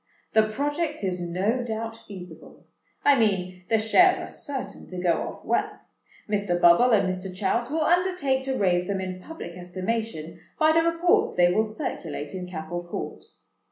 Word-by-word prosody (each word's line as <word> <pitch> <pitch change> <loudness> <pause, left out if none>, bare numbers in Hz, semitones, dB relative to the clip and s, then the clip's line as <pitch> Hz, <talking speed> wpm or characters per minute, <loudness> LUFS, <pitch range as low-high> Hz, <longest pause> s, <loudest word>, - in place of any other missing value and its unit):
The 220 -1 +4
project 290 +3 -2
is 180 -2 -1
no 190 +8 0
doubt 225 -1 -4
feasible—I 190 - -3
mean, 185 -4 0
the 225 - +4
shares 360 - +5
are - - -6
certain 275 -2 -6
to 185 - -8
go 180 -1 +2
off - - -7
well. - - 0 0.5
Mr. 200 -4 0
Bubble 175 +9 +6
and 215 -5 +4
Mr. 185 0 -3
Chouse 205 +6 -1
will 315 +2 0
undertake 350 -6 +2
to 265 -1 -1
raise 180 -2 +2
them 195 -1 -1
in 185 -1 -5
public 325 - -8
estimation, 180 -2 -4 0.2
by 310 0 +5
the 325 +1 +4
reports 335 +1 +2
they 175 0 +4
will 215 - +3
circulate 200 - -5
in 185 -1 -5
Capel 170 0 -5
Court. 175 - -6
205 Hz, 160 wpm, -26 LUFS, 180-265 Hz, 0.5 s, Bubble